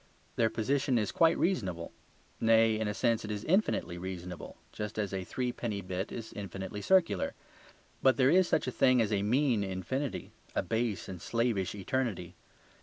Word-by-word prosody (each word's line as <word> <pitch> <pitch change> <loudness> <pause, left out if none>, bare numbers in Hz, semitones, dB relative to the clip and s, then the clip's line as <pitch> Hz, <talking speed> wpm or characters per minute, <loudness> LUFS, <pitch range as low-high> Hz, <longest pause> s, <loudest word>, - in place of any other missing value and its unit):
Their 115 -1 +3
position 130 +3 +1
is 105 -3 0
quite 165 0 +4
reasonable; 95 - -1 0.5
nay, 115 -1 +4
in 110 - 0
a 105 - -1
sense 115 -1 +1
it 105 - -6
is 105 0 -3
infinitely 155 - +1
reasonable, 90 -2 -7
just 105 +1 -5
as 100 -2 -1
a 95 -1 -2
threepenny 120 -2 -3
bit 95 +2 -4
is 115 -2 -7
infinitely 100 0 -6
circular. 170 - +2 0.7
But 130 -1 +4
there 130 0 +5
is 185 +1 +5
such - - +1
a 130 - -2
thing 130 0 +4
as 110 -2 +2
a 100 - +2
mean 120 0 +2
infinity, 100 +9 -3 0.2
a - - +1
base 110 -3 -1
and 90 -3 -7
slavish 115 -5 0
eternity. 100 -4 -2
110 Hz, 170 wpm, -31 LUFS, 95-130 Hz, 0.7 s, there